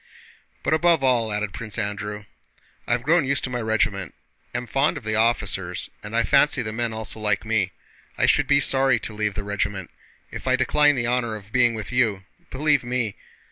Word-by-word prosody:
"But - - +1
above 165 -2 +3
all," 120 -4 +2
added 105 -1 -2
Prince 110 -2 -5
Andrew, 105 -1 -4 0.6
"I - - +2
have 120 0 -1
grown 165 +3 +3
used 135 +1 0
to 130 - -3
my 125 -1 -2
regiment, 105 -5 -1 0.4
am 125 - -3
fond 135 +4 +1
of 140 - -8
the 110 0 -2
officers, 115 +1 0
and 105 +1 -7
I 115 - +3
fancy 140 0 +3
the 110 -1 -5
men 120 0 -2
also 110 0 -4
like 105 0 0
me. 105 -4 0 0.5
I - - +3
should - - +3
be 140 0 +4
sorry 135 -3 +3
to 110 - -4
leave 105 -2 -2
the 100 - -4
regiment. 100 -2 -3 0.4
If - - -8
I - - +4
decline 145 -1 +3
the 120 -2 -1
honor 120 -2 0
of 105 0 -11
being 120 -1 +3
with 110 +1 -6
you, 110 -6 +1 0.3
believe 145 0 +2
me..." 120 -4 -2
115 Hz, 200 wpm, -23 LUFS, 105-130 Hz, 0.6 s, be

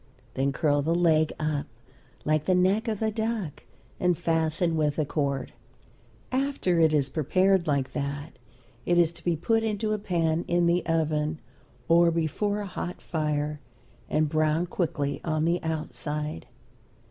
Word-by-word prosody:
Then 135 +1 0
curl 145 0 +1
the 165 +4 +1
leg 160 -3 +3
up 155 -2 -1 0.6
like 155 0 +1
the 185 - +3
neck 190 +5 +2
of 220 -1 -1
a 220 - +1
duck 220 -7 -3 0.3
and 180 -2 +2
fasten 165 0 +1
with 150 -2 +1
a 155 - +1
cord. 140 -2 -2 0.8
After 260 -10 +1
it 160 -1 +5
is 145 -3 +2
prepared 185 +5 +2
like 140 -3 0
that 145 -1 -4 0.4
it 175 - +2
is 170 -2 +4
to - - -11
be 175 -1 +1
put 225 +8 +1
into 215 -1 -1
a 215 - 0
pan 170 -4 0
in 175 0 +2
the 170 +1 +2
oven, 155 -1 0 0.5
or 170 +1 +5
before 170 +6 -1
a - - -4
hot 180 -1 -5
fire, 150 -2 -2 0.5
and 155 0 +2
browned 155 +3 +1
quickly 150 -5 -1
on 155 -1 0
the 170 +1 +1
outside. 150 -1 -4
160 Hz, 155 wpm, -27 LUFS, 150-180 Hz, 0.8 s, it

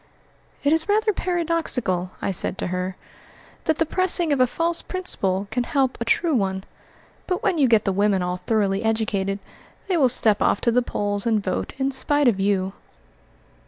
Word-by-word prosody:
"It 290 +1 +3
is 320 +4 +2
rather 430 +1 +2
paradoxical," 330 - 0
I - - 0
said 185 - 0
to - - -3
her, 185 +1 -3 0.7
"that 315 -1 +1
the 325 - +1
pressing 350 -2 +3
of 280 - -1
a 255 - +4
false 335 +5 0
principle 200 - -2
can 245 - -1
help 265 0 0
a - - -1
true 325 +7 +1
one; 190 -5 -1 0.6
but 365 +4 -2
when 380 -7 +1
you 275 - +4
get 225 -3 +3
the 195 - +1
women 200 -1 +1
all 180 0 -2
thoroughly 200 -1 0
educated, 205 -3 -1 0.5
they 370 -3 +1
will 270 -5 +4
step 220 -4 +2
off - - +2
to 235 - +2
the 250 +2 +3
polls 205 -3 -3
and 220 -3 +1
vote 185 - -3
in 270 0 0
spite 290 +1 +2
of 215 -5 +2
you." 195 -1 0
235 Hz, 185 wpm, -23 LUFS, 195-320 Hz, 0.7 s, a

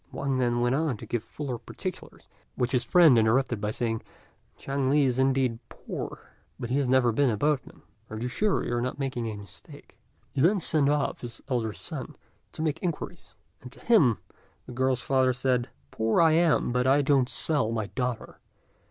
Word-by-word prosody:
Wang 135 -2 -2
then 120 -1 +1
went 120 +1 +2
on 145 -4 0
to - - -9
give 120 -2 -3
fuller 130 -5 -5
particulars, - - -8 0.3
which 125 0 -1
his 125 -3 +1
friend 160 -9 +6
interrupted 115 0 +2
by 105 - -1
saying, 115 0 -2 0.6
"Chang 135 -1 -2
li 145 0 +4
is 130 -1 0
indeed 130 -3 +1
poor, - - -8 0.3
but 120 - -5
he 135 - +2
has 135 -3 0
never 130 -2 +4
been 135 +4 +2
a 110 - -1
boatman. 145 +2 -1 0.3
Are 110 - -6
you 120 +3 -3
sure 205 +11 0
you - - -2
are 120 - 0
not 125 +3 -3
making 130 -4 -3
a 110 - -4
mistake?" 100 -3 -14 0.3
He 135 - -1
then 190 +7 +4
sent 155 -4 +2
off 145 -1 0
his 120 -1 -8
elder 120 -4 0
son 95 - -8 0.4
to 155 - -4
make 155 0 -1
inquiries; 170 -3 -5 0.3
and 125 - -11
to - - -15
him 155 - +4 0.5
the - - -10
girl's 130 0 0
father 130 -1 +2
said, 125 -1 0 0.2
"Poor 110 +5 +1
I 165 -1 +6
am, 160 -5 +3
but 125 +1 +1
I 140 +2 +4
don't 135 -2 +3
sell 145 -8 0
my 110 -2 -1
daughter. 125 +2 -4
130 Hz, 195 wpm, -27 LUFS, 120-140 Hz, 0.6 s, friend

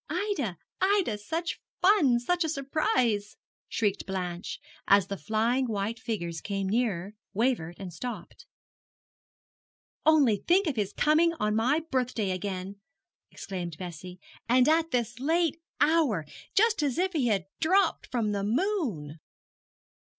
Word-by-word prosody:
'Ida, 325 - -2 0.2
Ida, 380 - +2
such 330 +10 -3 0.2
fun, 335 - +4
such 350 +8 0
a 320 - -1
surprise!' 275 - 0 0.3
shrieked 205 -3 -1
Blanche, 180 -2 -4 0.3
as 200 -1 +6
the 200 - -2
flying 225 - 0
white 220 +1 -2
figures 170 -9 -4
came 195 -2 -2
nearer, 205 -3 -1 0.2
wavered, 215 -8 0
and 185 -3 -7
stopped. 210 0 -7 1.6
'Only 285 -9 +5
think 370 - +2
of 300 -5 -1
his 205 -3 -1
coming 320 +6 +3
on 210 -9 -1
my 255 +8 +2
birthday 250 -6 0
again!' 185 +1 -4 0.5
exclaimed 175 -5 -6
Bessie, 180 0 -8 0.3
'and 250 +1 +5
at 325 +1 +3
this 240 -2 -1
late 325 +3 +1 0.2
hour 290 - +3 0.3
just 440 -2 +4
as 285 -1 0
if 375 +1 +1
he 280 -7 +1
had 200 -6 +1
dropped 380 +5 +2
from 230 -4 0
the 200 -1 -1
moon!' 225 - -1
235 Hz, 130 wpm, -28 LUFS, 195-315 Hz, 1.6 s, as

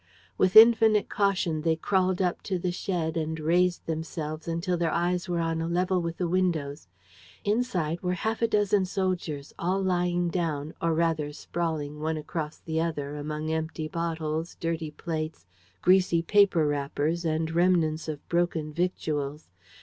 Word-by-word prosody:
With 185 +2 +2
infinite 220 -1 +7
caution 190 -6 +1
they 160 0 +2
crawled 185 +2 +1
up 180 -1 -1
to 190 - +1
the 180 0 -1
shed 175 -3 -2
and 160 0 -2
raised 175 +3 +2
themselves 160 -1 -4
until 170 +2 -1
their 170 -1 0
eyes 175 +2 0
were 175 - 0
on 165 -1 -1
a 165 - -2
level 180 +1 +1
with 170 0 -4
the 180 - -1
windows. 165 - -1 0.6
Inside 195 -7 0
were 180 0 -1
half 220 +5 -2
a 230 - +4
dozen 205 -3 +2
soldiers, 180 -7 -2
all 185 +3 0
lying 175 -2 +1
down, 160 -3 -2
or 165 -1 +1
rather 160 -3 0
sprawling 150 -2 -3
one 160 +1 -1
across 155 0 -4
the 160 0 -2
other, 150 -3 -3
among 150 +1 -4
empty 160 0 -2
bottles, 160 0 -3
dirty 165 -2 -2
plates, 155 0 -5 0.4
greasy 180 -2 +4
paper 200 -4 +4
wrappers 145 +3 -1
and 160 0 -1
remnants 165 -2 +2
of 150 -2 -6
broken 170 -3 0
victuals. 150 - -2
165 Hz, 155 wpm, -27 LUFS, 155-180 Hz, 0.6 s, infinite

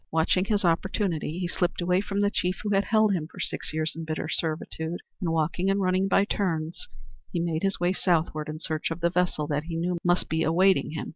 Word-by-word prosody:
Watching 165 +3 +2
his 205 -2 +1
opportunity 170 -2 0
he 180 -1 -1
slipped 175 0 -1
away 180 +1 +2
from 200 0 -2
the 205 0 +2
chief 180 -3 -1
who 205 -1 0
had 195 +1 +3
held 215 -2 +3
him 160 -4 -2
for - - -14
six - - -4
years 155 0 -1
in 165 - -5
bitter 155 0 -3
servitude, 160 +1 -3 0.2
and 180 -5 -1
walking 165 +4 0
and 195 +1 +2
running 185 0 +2
by 195 +1 +4
turns 170 - -2 0.4
he 175 - -1
made 165 -1 -1
his 195 0 0
way 175 +1 +2
southward 160 -4 0
in 155 0 -5
search 155 -1 -2
of 165 +1 -5
the 170 0 +2
vessel 180 -4 +1
that 145 0 -2
he 165 -1 -5
knew 175 +1 -1
must 175 0 +2
be 160 0 0
awaiting 180 +1 +3
him. 160 - -4
175 Hz, 225 wpm, -27 LUFS, 160-190 Hz, 0.4 s, by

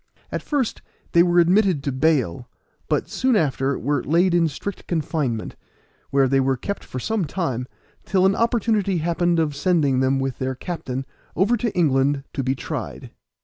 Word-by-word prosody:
At - - -2
first 280 -6 -1 0.3
they 170 - +6
were 175 0 +3
admitted 180 -3 +4
to 140 - -1
bail, 130 - 0 0.4
but - - 0
soon 255 -2 +1
after 140 -6 +1
were 145 +2 -1
laid 175 +3 +2
in 170 -1 +4
strict 185 +7 -6
confinement, 150 -8 -2 0.5
where 135 -1 +3
they 135 +1 +2
were 135 0 +1
kept 200 +11 -4
for 130 - -6
some 220 - -1
time, 135 -7 -3 0.4
till 190 -1 +2
an 195 +1 +4
opportunity 220 -5 +1
happened 170 +1 +1
of 155 -3 0
sending 145 -4 +2
them 130 +1 +2
with 135 -1 -3
their 130 0 -2
captain 135 -5 -5 0.3
over 200 +7 +3
to 230 -1 -1
England 140 -3 +2
to 135 - -1
be 130 +1 0
tried. - - -6
160 Hz, 170 wpm, -22 LUFS, 135-185 Hz, 0.5 s, they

